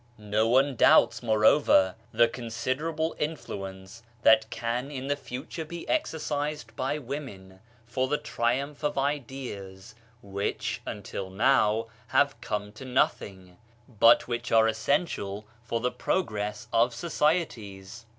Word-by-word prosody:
No 105 +1 0
one 135 +3 +3
doubts, 115 0 +5
moreover, 110 -4 +4 0.2
the 120 +1 +5
consider 125 +6 -3
able 160 0 -2
influence 95 -9 -5 0.2
that 110 0 +5
can 120 +4 -3
in 135 -2 -5
the 145 - +2
future 140 +4 -6
be 170 +2 -8
exercised 150 - -2
by 135 +3 -1
women 120 -10 -7 0.3
for 130 +3 -1
the 150 +2 +1
triumph 135 +5 -2
of 150 -1 -1
ideas 125 -8 -4 0.3
which 100 +4 -3
until 100 -2 -5
now 110 +1 +3 0.2
have - - +2
come 105 0 -3
to 110 +5 -11
nothing, 95 -7 -1 0.3
but 115 0 +5
which 120 0 -3
are 115 0 +5
essential 110 - -1 0.2
for 115 -1 -2
the 125 +2 0
progress 105 - -2
of 120 +1 +3
societies. 120 - -2
120 Hz, 125 wpm, -28 LUFS, 105-140 Hz, 0.3 s, doubts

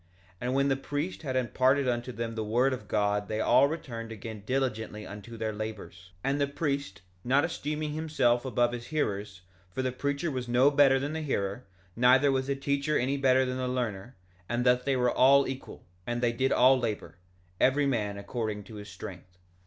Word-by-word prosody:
And 125 +1 -1
when 140 0 +3
the 135 - +2
priest 145 +6 -4
had 135 -5 -3
imparted 130 +2 +2
unto 120 0 -1
them 115 -1 -4
the 110 -1 -3
word 120 +5 +2
of 105 -5 -7
God 105 -1 0
they 110 0 -2
all 125 +5 +5
returned 120 -8 -6
again 110 -1 -7
diligently 110 -5 -2
unto 105 +3 -9
their 110 -1 -2
labors; 105 -4 -7
and 140 +2 0
the 140 - +2
priest, 140 - -3 0.2
not 135 +4 +3
esteeming 150 -2 -3
himself 140 -6 +1
above 120 -2 +1
his 120 0 -6
hearers, 100 -10 -2 0.3
for 130 +9 -3
the 130 - 0
preacher 140 +5 -2
was 130 -2 -4
no 125 +4 +4
better 140 -2 +5
than 145 +3 -3
the 160 - -3
hearer, 100 -6 -2 0.3
neither 130 +4 +5
was 130 0 0
the 140 - 0
teacher 140 +2 0
any 130 +3 0
better 130 -1 +3
than 125 0 -3
the 130 0 -2
learner; 120 -2 -3 0.3
and 120 +1 0
thus 125 0 +4
they 140 0 +1
were 125 -1 +2
all 140 +2 +5
equal, 135 0 -7 0.2
and 120 0 -1
they 120 -1 +2
did 130 +3 0
all 130 +1 +5
labor, 110 -5 -4 0.4
every 140 +2 +3
man 105 -7 -1
according 105 -1 -4
to 110 +1 -11
his 105 0 -9
strength. 90 -2 -10
125 Hz, 195 wpm, -29 LUFS, 110-140 Hz, 0.4 s, all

